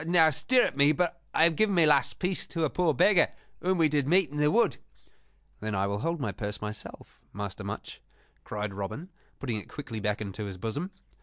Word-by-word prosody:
"Now, 165 -2 +5
stirrup 245 - +2
me 140 +2 +5
but 170 +2 -1
I - - +3
have 165 -1 +5
given 205 +3 +2
my 170 -2 +5
last 145 -4 +3
piece 180 0 -1
to 165 -2 -2
a 155 - +1
poor 175 -3 +2
beggar 180 +7 +4 0.3
whom 185 +1 +1
we 165 -2 +4
did 145 -2 0
meet 175 -2 +3
in 150 - -6
the 150 0 +4
wood." 235 +7 +2 0.8
"Then 110 -1 -3
I 95 0 +1
will 100 +1 -2
hold 165 +6 -1
my 135 - -2
purse 105 -2 -5
myself, 105 0 -8
Master 100 0 -5
Much," 100 +1 -7 0.4
cried 105 -1 -4
Robin, 100 - -5 0.3
putting 120 -5 -2
it 105 - -8
quickly 120 -6 -6
back 105 0 -1
into 105 0 -5
his 95 -2 -6
bosom. 115 - -3
145 Hz, 210 wpm, -28 LUFS, 105-170 Hz, 0.8 s, Now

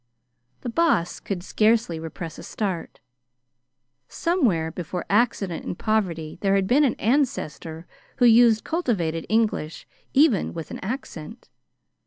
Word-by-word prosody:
The 245 - -4
Boss 235 - +1
could 185 -3 -4
scarcely 215 -5 +2
repress 165 0 -7
a - - -7
start. 190 -6 -4 1.1
Somewhere 225 - 0
before 175 +1 -5
accident 205 -5 +1
and 175 - -5
poverty 180 -8 -1
there 195 -1 +2
had 195 -1 +2
been 270 +9 +4
an 265 - +2
ancestor 185 - -1 0.3
who 250 - +3
used 230 -1 +6
cultivated 185 - -1
English, 215 -8 0 0.3
even 270 - +3
with 165 -2 -6
an - - -6
accent. 220 - -7
205 Hz, 125 wpm, -24 LUFS, 165-240 Hz, 1.1 s, used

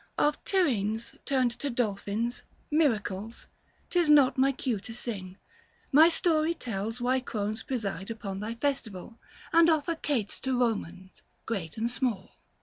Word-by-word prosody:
Of 295 0 +1
Tyrrhenes 230 - 0
turned 260 -3 +2
to 285 - -2
dolphins, 230 0 -1 0.3
miracles 225 -8 0 0.2
— - - -37
'Tis 350 -3 +3
not 285 -3 +6
my 270 +1 +4
cue 250 -5 -2
to 225 +3 -9
sing 195 -6 -5 0.3
— - - -32
my 315 +4 +8
story 325 -1 +2
tells 225 -3 -4
775 245 - -4
Why 260 +1 +3
crones 215 -3 -3
preside 200 -7 -3
upon 200 -4 -5
thy 220 +3 -4
festival 230 -5 -3 0.3
And 335 0 +7
offer 320 +1 +2
cates 275 -10 -2
to 260 -1 -1
Komans 200 -6 -2 0.3
STeat 195 -7 -4
and 230 +2 0
small. 240 -7 -2
235 Hz, 150 wpm, -29 LUFS, 210-280 Hz, 0.3 s, my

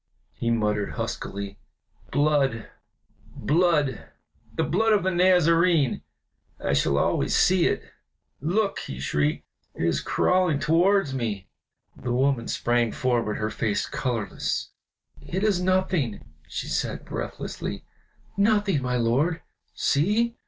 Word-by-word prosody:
he 115 - -2
muttered, 105 -3 0
huskily. 100 0 -5 0.5
"Blood, 140 -6 +1 0.7
blood 150 -4 +1 0.4
the - - -1
blood 225 0 +2
of 205 - +2
the 190 - +1
Nazarene! 175 -4 +3 0.6
I - - -1
shall 70 0 +2
always - - +1
see 185 -2 +4
it. - - -1 0.6
Look!" 195 +8 0
he 65 - -7
shrieked, 75 +2 0 0.3
"it - - -2
is - - +1
crawling 180 -5 +2
towards 170 +1 +2
me!" 105 -8 -3 0.5
The 125 - -5
woman 130 -1 +1
sprang 120 -1 +1
forward, 120 -4 0
her 110 0 -2
face 110 -3 -1
colorless. 120 -5 -3 0.5
"It 190 +3 -3
is 200 -4 +2
nothing!" 185 - 0 0.2
she - - -5
said, - - -2
breathlessly, - - -5 0.5
"nothing, 200 -6 +2
my 125 -1 -1
lord! 140 +9 +1 0.3
See! 210 +11 +1
140 Hz, 115 wpm, -25 LUFS, 115-180 Hz, 0.7 s, see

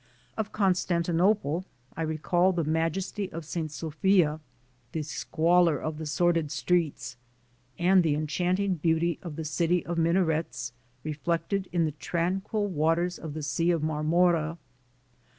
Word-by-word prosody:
Of 215 -2 -3
Constantinople 180 -2 +1 0.3
I 165 - -4
recall 175 +4 +1
the 170 -2 0
majesty 165 +6 -1
of 165 0 -6
St. 160 -1 -3
Sophia, 155 +1 +1 0.5
the 160 - -2
squalor 165 +1 +2
of 155 0 -4
the 160 - -4
sordid 165 0 +1
streets 165 -8 -1 0.6
and 185 +2 +5
the 160 -4 +1
enchanting 180 +6 0
beauty 165 +1 +1
of 165 -4 -7
the 160 0 -5
city 170 +3 +1
of 170 -1 -2
min 165 +1 +3
arets 160 -8 0 0.3
reflected 165 +5 -2
in 170 -2 +2
the 155 - -1
tranquil 185 +7 -1
waters 170 0 0
of 155 -2 -7
the 155 - -4
Sea 165 +4 0
of 165 -3 +1
Marmora. 160 +1 +2
165 Hz, 135 wpm, -28 LUFS, 155-180 Hz, 0.6 s, and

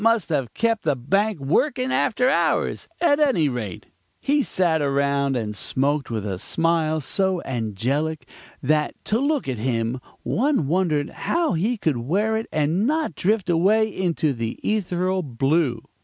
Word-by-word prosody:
must 230 -7 +2
have 135 -8 -1
kept 230 -1 +1
the 150 -3 +1
bank 195 - 0
working 255 - +1
after 250 0 +2
hours; 270 - +1
at 300 -4 +4
any 265 - +3
rate, 115 -9 -4 0.3
he 290 +1 +2
sat 170 - +1
around 140 -1 +1
and 110 -3 -3
smoked 140 +6 0
with 110 -3 -3
a 95 -3 -3
smile 165 - +1
so 190 +5 0
angelic, 130 +7 -2 0.4
that, 150 +2 +1
to 220 - +1
look 285 - 0
at 125 -4 -3
him, 115 +1 -1 0.2
one 270 - +1
wondered 155 -2 0 0.2
how 335 - +2
he 210 +9 0
could 155 - 0
wear 195 - 0
it 220 +1 -2
and 160 +8 +1
not 310 - 0
drift 200 +4 0
away 195 +6 +3
into 165 -5 0
the 115 -2 -3
ethereal 185 -3 0
blue. 135 -2 0
160 Hz, 155 wpm, -23 LUFS, 135-215 Hz, 0.4 s, at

